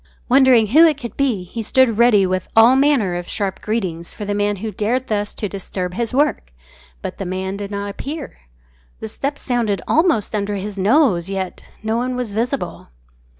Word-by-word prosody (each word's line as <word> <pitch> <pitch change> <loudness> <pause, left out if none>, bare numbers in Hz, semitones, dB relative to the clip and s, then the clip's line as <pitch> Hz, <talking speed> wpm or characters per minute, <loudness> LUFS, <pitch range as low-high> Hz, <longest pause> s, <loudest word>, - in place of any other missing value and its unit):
Wondering 255 -4 +5
who 310 +8 +7
it 305 -3 +1
could 240 -5 -7
be, 250 -9 0
he 225 +6 -6
stood 230 0 +2
ready 225 -5 +5
with 185 -1 -2
all 230 +3 +7
manner 265 -9 +3
of 175 0 -4
sharp 195 -2 -3
greetings 185 -7 -3
for 210 - -6
the 205 - -2
man 205 0 0
who 215 +3 -5
dared 230 +6 -1
thus 205 -3 -2
to 210 - -3
disturb 185 -2 -5
his 235 +3 -2
work. 255 - 0 0.5
But - - -6
the 195 - -3
man 190 +1 -3
did 200 0 -5
not 200 0 -4
appear. 290 +7 -7 0.6
The - - -5
steps 280 - -4
sounded 235 -6 0
almost 320 - +2
under 205 -1 -1
his 200 +1 -5
nose, 200 - +2
yet 190 -2 -4 0.2
no 220 +1 0
one 250 +1 -1
was 245 -5 -3
visible. 245 +5 -3
215 Hz, 190 wpm, -19 LUFS, 195-250 Hz, 0.6 s, who